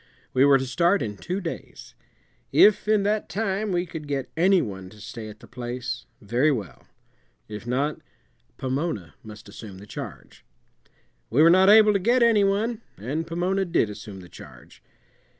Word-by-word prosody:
We 130 - +4
were 140 -1 +6
to 135 - -3
start 170 +6 +2
in 105 -2 -4
two 180 - -4
days. 165 -3 -8 0.6
If 210 0 +5
in 215 -2 +3
that 210 +1 0
time 205 0 -1
we 175 0 0
could 160 -3 -8
get 140 -2 -3
any 185 +3 +4
one 95 - -5
to 105 - -16
stay 110 +1 -8
at 105 0 -13
the - - -14
place, 120 0 -5
very 120 +9 +1
well; 105 - -5 0.6
if 105 +2 -8
not, 140 +5 -1 0.6
Pomona 130 - -3
must 105 -1 -12
assume 100 -1 -10
the 100 - -11
charge. - - -9 0.9
We 140 +7 +4
were 165 - +7
not 190 +2 +6
able 215 0 +7
to 200 - +2
get 240 +6 +3
any 225 -3 +4
one, 215 +4 0 0.2
and 145 - -3
Pomona 180 +4 0
did 170 - +1
assume 100 -2 -9
the 90 - -12
charge. - - -14
150 Hz, 170 wpm, -25 LUFS, -, 0.9 s, were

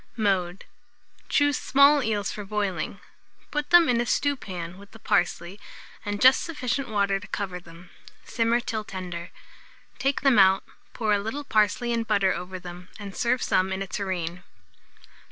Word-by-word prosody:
Mode. 190 -4 0 0.6
Choose 290 -2 +2
small 280 +2 +5
eels 210 -4 -1
for 210 - -6
boiling; 200 -2 -3 0.5
put 295 0 -2
them 345 -1 +7
in 240 -1 +2
a - - -1
stewpan 185 -11 -2
with 200 0 -15
the - - -11
parsley, 180 -2 -1 0.4
and 205 0 -3
just 260 +3 +6
sufficient 275 -5 -3
water 200 -2 +1
to 200 - -12
cover 185 -3 -4
them; 175 +1 -15 0.3
simmer 230 0 +1
till 220 -2 -3
tender. 180 -3 -7 0.7
Take 275 0 0
them 270 -6 +4
out, 190 0 +5 0.3
pour 215 -2 0
a 205 - +2
little 225 +8 -4
parsley 230 0 +1
and 230 -1 -1
butter 200 -3 +2
over 185 +1 -6
them, 180 0 -10
and 200 -2 -8
serve 245 +1 +1
some 185 +1 +1
in 190 +1 -2
a - - -9
tureen. 180 -4 -3
205 Hz, 160 wpm, -26 LUFS, 185-240 Hz, 0.7 s, them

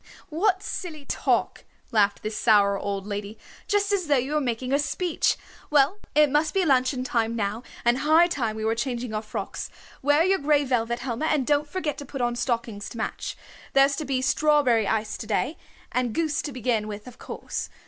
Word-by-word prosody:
"What 375 +4 +1
silly 310 -9 -5
talk," - - 0 0.3
laughed 205 -3 +2
the 215 - -2
sour 205 -2 +4
old 200 -1 -3
lady. 205 +1 -5 0.3
"Just 410 -1 +1
as 370 -5 0
though 290 -2 +4
you 260 +4 -1
were 300 - +2
making 250 0 -2
a 280 - +4
speech. 335 +3 0 0.3
Well, 295 +7 +3 0.2
it 300 -2 +5
must 305 +4 +1
be 380 -2 +3
luncheon 255 -2 +2
time 230 -2 0
now, 210 +1 -2 0.2
and 240 +2 +3
high 315 +4 +5
time 250 -11 -1
we 220 0 -3
were 220 - +2
changing 235 -1 -3
our 215 - -1
frocks. 215 - -5 0.3
Wear 290 +3 +4
your 380 +2 +3
gray 290 0 +3
velvet, 235 -2 0
Helma, 255 +4 -2
and 295 -5 +1
don't 290 +1 +1
forget 320 -3 -3
to 285 - -7
put 275 0 -7
on 240 -1 0
stockings 235 -4 -2
to - - -9
match. 220 - -4 0.4
There's 275 +1 +5
to 305 - -3
be 260 -2 -1
strawberry 270 -7 +3
ice 220 0 -1
to 215 - -6
day, 255 +8 0 0.4
and 245 -3 -1
goose 315 -2 0
to 290 - -5
begin 235 -4 -1
with 210 0 -7
of 250 -1 -12
course. - - -5
255 Hz, 200 wpm, -25 LUFS, 225-300 Hz, 0.4 s, it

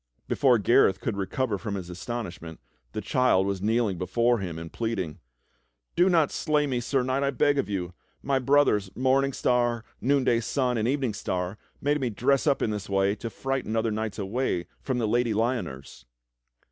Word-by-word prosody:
Before 130 -4 +4
Gareth 105 -2 +4
could 115 - -2
recover 100 +2 -2
from 105 -1 -4
his 95 -3 -5
astonishment, 90 -3 -6 0.3
the - - -3
child 125 -7 +2
was 100 -1 -2
kneeling 110 -3 +1
before 120 +5 +1
him 90 -4 -5
and 80 0 -8
pleading: 110 -9 -3 0.8
"Do 180 +2 +4
not 165 -5 +3
slay 150 -1 +1
me. 130 -3 -1
Sir 125 +2 0
Knight, 130 +2 0
I 140 - +2
beg 145 +2 +2
of 135 - -1
you! 90 -3 -3 0.3
My 135 -1 +1
brothers. 130 -7 +3
Morn 130 +2 +3
ing 135 - -3
Star, 120 -2 +1 0.2
Noonday 130 -3 +2
Sun, 125 0 0
and 110 - 0
Evening 130 -4 0
Star 90 0 -3 0.2
made 145 +1 0
me 125 - 0
dress 135 +7 +1
up 140 - +2
in 110 - 0
this 105 -1 -5
way 95 0 +2
to 115 - -5
frighten 135 -3 -3
other 115 0 +1
knights 110 -1 -3
away 100 -3 -1 0.2
from 130 -2 -2
the 115 -3 0
Lady 120 0 +1
Lyoners." 95 - -3
115 Hz, 185 wpm, -27 LUFS, 100-130 Hz, 0.8 s, Before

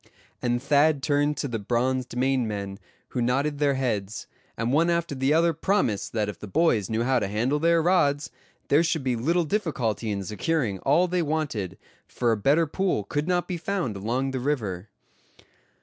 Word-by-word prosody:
and 120 0 0
Thad 145 0 +3
turned 145 0 +1
to - - -2
the 115 -3 -3
bronzed 125 +3 -1
Maine 130 -2 +1
men, 100 -2 -5 0.3
who 125 - -2
nodded 140 +4 0
their 140 -2 +2
heads, 110 -6 -2 0.3
and 115 +3 -1
one 165 +4 +3
after 170 -2 0
the 135 +1 0
other 165 +2 +3
promised 160 - 0
that 110 -3 0
if 105 - -6
the 105 - -8
boys 115 - +2
knew 110 +1 0
how 130 +1 +2
to 100 - -2
handle 120 +8 0
their 165 +1 +3
rods, 150 -5 +2 0.4
there 145 +3 +5
should 160 -3 0
be 130 -2 0
little 165 +9 +1
difficulty 140 - -1
in 100 -2 -2
securing 105 - -1
all 160 - +3
they 180 0 0
wanted, 145 - -2 0.3
for 120 -2 0
a - - +3
better 140 +10 +3
pool 180 - -1
could 145 - -2
not 180 -1 +1
be 180 - -3
found 175 - -2
along 120 +7 -1
the 130 - -2
river. 110 -9 -2
135 Hz, 185 wpm, -26 LUFS, 115-160 Hz, 0.4 s, there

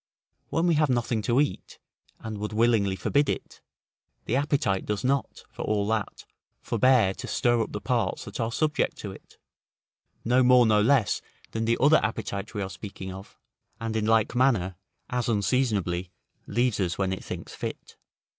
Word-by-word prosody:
When 165 - +1
we 175 - +4
have 150 - +3
nothing 120 -2 0
to 120 +4 +2
eat, 145 0 -2 0.4
and 110 -2 -6
would 105 +1 -4
willingly 110 -4 +2
forbid 145 +8 +1
it, - - -4 0.6
the 115 - 0
appetite 140 -9 +1
does 105 -1 -3
not, 135 +1 -1
for - - -8
all 105 -1 0
that, 110 -2 -2 0.3
forbear 125 -7 +3
to - - -8
stir 120 -1 +2
up 110 - -3
the - - -4
parts - - -1
that - - -8
are 115 0 -1
subject 155 +5 0
to 100 - -6
it, 95 - -15 0.9
no 125 +3 +4
more 125 -1 +6
nor 105 -1 +4
less 115 -3 +3 0.3
than 115 0 -2
the 115 +1 +2
other 150 +4 +6
appetite 105 -1 -3
we 105 - -1
were 95 - -4
speaking 95 -1 -8
of, 95 +1 -11 0.4
and 115 -1 -3
in 110 -1 0
like 110 -1 +3
manner, 120 -8 +2 0.4
as 125 -1 -1
unseasonably 100 -5 0 0.4
leaves 120 0 +1
us, 90 -3 -1
when 95 -1 0
it 95 - -6
thinks - - -7
fit. - - -7
110 Hz, 175 wpm, -27 LUFS, 100-125 Hz, 0.9 s, more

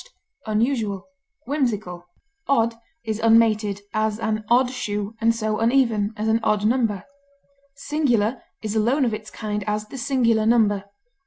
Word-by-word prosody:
eccentric, 215 -3 0 0.4
ludicrous, 215 - -2 0.5
Odd 235 -4 +2 0.3
is 220 -2 -3
unmated, 220 -3 +3
as 215 -1 0
an 220 -1 -2
odd 250 +1 +4
shoe, 210 -4 -3
and 230 0 +3
so 215 -1 -1
uneven, 225 -3 +2
as 215 +1 -2
an 220 +1 +3
odd 215 -2 +1
number. 220 -5 +1 0.7
Singular 265 -6 0 0.2
is 215 0 -3
alone 245 +6 +2
of 230 - 0
its 215 0 -6
kind; 210 -2 -4
as, 210 0 -2
the 270 - -7
singular 235 -5 +2
number. 210 -4 +3
220 Hz, 140 wpm, -23 LUFS, 210-240 Hz, 0.7 s, odd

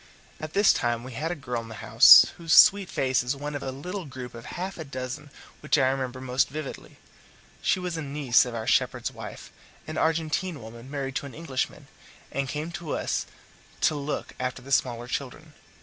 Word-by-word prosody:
At 155 0 -7
this 200 0 +5
time 120 -1 -1
we 130 - -8
had 150 +7 -3
a 175 - -2
girl 125 -5 -4
in 115 - -11
the 110 - -8
house, - - +9
whose 165 -2 0
sweet 200 -2 +7
face 130 -1 +1
is 125 +3 -2
one 145 +2 -5
of 145 - -4
a - - -4
little 180 +8 -6
group 130 -3 -8
of 115 -1 -10
half 185 +1 -5
a - - -3
dozen 135 +1 -6 0.3
which 150 - +1
I 130 -2 +4
remember 130 -1 -3
most 130 0 0
vividly. 150 0 -7 0.6
She - - +2
was 180 -2 -3
a - - -3
niece 140 -4 +3
of 125 -2 -6
our 110 -1 -4
shepherd's - - +1
wife, - - -9 0.3
an - - -4
Argentine 160 +1 0
woman 115 +3 -11
married 135 -2 -4
to 140 - -5
an 135 - -11
Englishman, 145 -5 -3 0.5
and 140 -1 -2
came 155 +3 -4
to 170 -2 -4
us - - -2 0.5
to - - +3
look 145 0 -4
after 125 0 -3
the 140 - -11
smaller 120 -3 +1
children. 145 +4 -5
140 Hz, 200 wpm, -26 LUFS, 125-155 Hz, 0.6 s, house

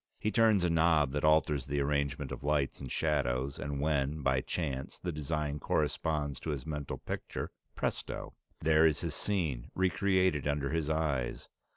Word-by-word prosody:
He 105 - -1
turns 110 -5 +4
a 90 - +3
knob 80 -4 +4
that 75 0 -2
alters 75 -2 +3
the 70 0 0
arrangement 70 -1 0
of 70 - -6
lights 75 -2 0
and 65 - -6
shadows, 70 -3 0
and 70 -1 -3
when, 75 0 0
by 65 -1 +2
chance, 70 -5 -3
the 90 - -3
design 75 -1 -2
corresponds 75 -1 0
to - - -5
his 70 -4 -3
mental 75 -3 -4
picture - - -5 0.2
presto! - - -3 0.3
There 80 +1 +5
is 75 - 0
his - - -2
scene 80 -12 -1
re 95 0 +2
created 95 -7 +2
under 70 -1 0
his 80 -2 0
eyes. 75 -6 -1
75 Hz, 170 wpm, -32 LUFS, 70-80 Hz, 0.3 s, There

